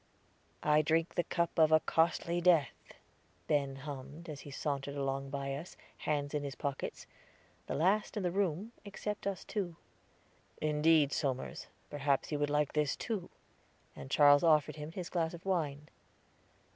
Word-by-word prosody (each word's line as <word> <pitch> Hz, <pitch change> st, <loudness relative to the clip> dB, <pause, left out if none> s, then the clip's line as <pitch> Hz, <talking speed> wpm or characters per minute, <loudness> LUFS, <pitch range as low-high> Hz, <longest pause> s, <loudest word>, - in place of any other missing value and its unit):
"'I 150 Hz, 0 st, +5 dB
drink 165 Hz, +2 st, +1 dB
the 175 Hz, -, +1 dB
cup 170 Hz, -1 st, -1 dB
of 160 Hz, -1 st, +6 dB
a 155 Hz, -, +7 dB
costly 170 Hz, +2 st, +1 dB
death,'" 170 Hz, -5 st, +2 dB, 0.5 s
Ben 140 Hz, +1 st, +1 dB
hummed, 140 Hz, +3 st, -8 dB
as 150 Hz, -2 st, -6 dB
he 145 Hz, -, -10 dB
sauntered 140 Hz, 0 st, -3 dB
along 135 Hz, 0 st, -2 dB
by 140 Hz, 0 st, -3 dB
us, 150 Hz, +6 st, -7 dB, 0.2 s
hands 145 Hz, -1 st, -1 dB
in 150 Hz, -1 st, -1 dB
his 140 Hz, -1 st, -5 dB
pockets 140 Hz, -2 st, -4 dB, 0.6 s
the -, -, -2 dB
last 195 Hz, +8 st, +2 dB
in 205 Hz, -, -1 dB
the 175 Hz, -, +1 dB
room, 195 Hz, +2 st, -1 dB
except 205 Hz, 0 st, -4 dB
us 195 Hz, -3 st, -3 dB
two. 185 Hz, -6 st, -3 dB, 0.8 s
"Indeed, 150 Hz, -1 st, +3 dB
Somers; 130 Hz, -3 st, -2 dB, 0.2 s
perhaps 145 Hz, -1 st, 0 dB
you 150 Hz, -, -1 dB
would 145 Hz, 0 st, +1 dB
like 150 Hz, -1 st, +1 dB
this 150 Hz, -2 st, +1 dB
too." 210 Hz, -7 st, -4 dB, 0.7 s
And -, -, -9 dB
Charles 145 Hz, 0 st, +6 dB
offered 155 Hz, -2 st, +4 dB
him 150 Hz, +1 st, -6 dB
his 180 Hz, -1 st, -5 dB
glass 165 Hz, -1 st, 0 dB
of 170 Hz, -, -13 dB
wine. 150 Hz, -6 st, -1 dB
150 Hz, 160 wpm, -33 LUFS, 145-170 Hz, 0.8 s, a